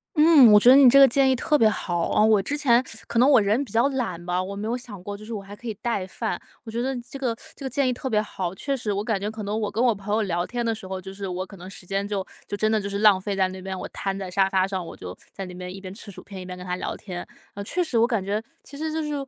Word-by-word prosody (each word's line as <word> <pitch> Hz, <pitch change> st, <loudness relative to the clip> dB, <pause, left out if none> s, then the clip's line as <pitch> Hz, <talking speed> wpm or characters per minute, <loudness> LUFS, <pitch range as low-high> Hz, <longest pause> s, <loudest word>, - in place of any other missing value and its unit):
嗯， 300 Hz, -7 st, +7 dB
我 210 Hz, -, +8 dB
觉 240 Hz, -, +6 dB
得 260 Hz, -, +9 dB
你 275 Hz, -2 st, +8 dB
这 275 Hz, +3 st, +7 dB
个 275 Hz, -, +9 dB
建 270 Hz, +2 st, +3 dB
议 -, -, +3 dB
特 300 Hz, +4 st, +2 dB
别 225 Hz, -5 st, +5 dB
好。 175 Hz, -5 st, -1 dB
哦 210 Hz, -, +4 dB
我 220 Hz, -1 st, +5 dB
之 240 Hz, +10 st, -2 dB
前， 255 Hz, -5 st, +3 dB, 0.2 s
可 235 Hz, -, -3 dB
能 250 Hz, -, +6 dB
我 255 Hz, -6 st, +6 dB
人 215 Hz, +8 st, +1 dB
比 -, -, -13 dB
较 235 Hz, +4 st, +3 dB
懒 230 Hz, -11 st, -3 dB
吧， 180 Hz, +1 st, -1 dB
我 200 Hz, +1 st, -6 dB
没 210 Hz, +2 st, -4 dB
有 240 Hz, -, -1 dB
想 230 Hz, -6 st, -10 dB
过 205 Hz, 0 st, -6 dB
就 215 Hz, -, -11 dB
是 230 Hz, -, -6 dB
我 205 Hz, -, -4 dB
还 200 Hz, +1 st, -11 dB
可 235 Hz, -, -10 dB
以 220 Hz, -, -2 dB
带 215 Hz, -6 st, -1 dB
饭， 220 Hz, +4 st, -4 dB, 0.3 s
我 -, -, -8 dB
觉 230 Hz, -, -3 dB
得 265 Hz, +1 st, -1 dB
这 275 Hz, -, -7 dB
个 245 Hz, -4 st, -1 dB, 0.2 s
这 275 Hz, -, -9 dB
个 -, -, -2 dB
建 275 Hz, -1 st, +1 dB
议 -, -, +2 dB
特 250 Hz, -, -4 dB
别 215 Hz, -4 st, +2 dB
好。 185 Hz, -4 st, -4 dB
确 275 Hz, +8 st, -2 dB
实 215 Hz, -5 st, -2 dB
我 200 Hz, +1 st, -2 dB
感 220 Hz, -4 st, -1 dB
觉 200 Hz, -, -3 dB
可 220 Hz, -1 st, -7 dB
能 210 Hz, +2 st, -2 dB
我 210 Hz, -, -2 dB
跟 225 Hz, +4 st, 0 dB
我 240 Hz, -3 st, +3 dB
朋 200 Hz, +1 st, -4 dB
友 220 Hz, -, +2 dB
聊 175 Hz, -4 st, -1 dB
天 240 Hz, 0 st, -3 dB
的 230 Hz, -1 st, 0 dB
时 190 Hz, -3 st, -10 dB
候， 190 Hz, 0 st, -5 dB
就 190 Hz, +1 st, -8 dB
是 200 Hz, 0 st, -5 dB
我 185 Hz, 0 st, -3 dB
可 195 Hz, -, -12 dB
能 180 Hz, +1 st, -10 dB
时 195 Hz, -, -10 dB
间 195 Hz, +1 st, -1 dB
就 200 Hz, -2 st, -2 dB, 0.2 s
就 205 Hz, -, -3 dB
真 215 Hz, +2 st, +1 dB
的 220 Hz, -, +2 dB
就 200 Hz, -, -4 dB
是 200 Hz, 0 st, -3 dB
浪 210 Hz, -3 st, +6 dB
费 200 Hz, +1 st, -3 dB
在 190 Hz, -1 st, +2 dB
那 185 Hz, 0 st, -8 dB
边， 190 Hz, 0 st, -5 dB
我 -, -, -5 dB
摊 195 Hz, -1 st, -3 dB
在 190 Hz, -2 st, -5 dB
沙 190 Hz, +1 st, +2 dB
发 190 Hz, 0 st, +1 dB
上， 190 Hz, -3 st, -4 dB
我 -, -, -9 dB
就， 90 Hz, 0 st, -9 dB, 0.2 s
在 195 Hz, -, -6 dB
那 180 Hz, -, -9 dB
边 180 Hz, 0 st, -7 dB
一 195 Hz, -, -9 dB
边 185 Hz, -1 st, -8 dB
吃 205 Hz, 0 st, -10 dB
薯 -, -, -10 dB
片， 195 Hz, -2 st, -10 dB
一 185 Hz, -, -8 dB
边 180 Hz, 0 st, -7 dB
跟 180 Hz, -, -9 dB
他 180 Hz, 0 st, -2 dB
聊 180 Hz, -, -4 dB
天。 180 Hz, -3 st, -7 dB, 0.3 s
呃， 200 Hz, -, -5 dB
确 360 Hz, -, -1 dB
实 260 Hz, -8 st, -2 dB
我 230 Hz, -, +5 dB
感 225 Hz, -6 st, -1 dB
觉 205 Hz, +2 st, -1 dB, 0.2 s
其 280 Hz, -, -11 dB
实 315 Hz, +1 st, -3 dB
就 320 Hz, -, -1 dB
是 300 Hz, -1 st, -3 dB
210 Hz, 360 characters per minute, -24 LUFS, 190-240 Hz, 0.3 s, 得